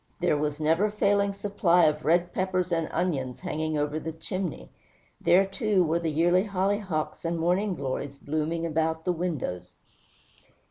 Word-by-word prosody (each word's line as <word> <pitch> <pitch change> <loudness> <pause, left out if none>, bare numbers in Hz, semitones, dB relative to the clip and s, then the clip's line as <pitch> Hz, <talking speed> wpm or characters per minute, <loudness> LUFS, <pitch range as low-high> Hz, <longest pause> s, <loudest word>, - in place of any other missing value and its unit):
There - - +2
was 150 0 -1
the 155 - -5
never 165 +7 +3
failing 200 -1 +2
supply 195 -3 +2
of 150 0 +1
red 175 +2 +2
peppers 185 -1 -1
and 165 -2 0
onions 135 -8 -2
hanging 155 -3 -2
over 150 +1 -1
the 160 - -5
chimney. 180 +1 -5 0.5
There, 190 +3 +5
too, 195 -1 +1
were 165 +1 +1
the 165 -1 -1
yearly 175 +5 +3
hollyhocks 195 -4 -1
and 170 0 -1
morning 180 +4 +1
glories 140 0 -4
blooming 155 +4 -2
about 160 0 -1
the 180 - +2
windows. 125 - -4
170 Hz, 155 wpm, -27 LUFS, 155-185 Hz, 0.5 s, There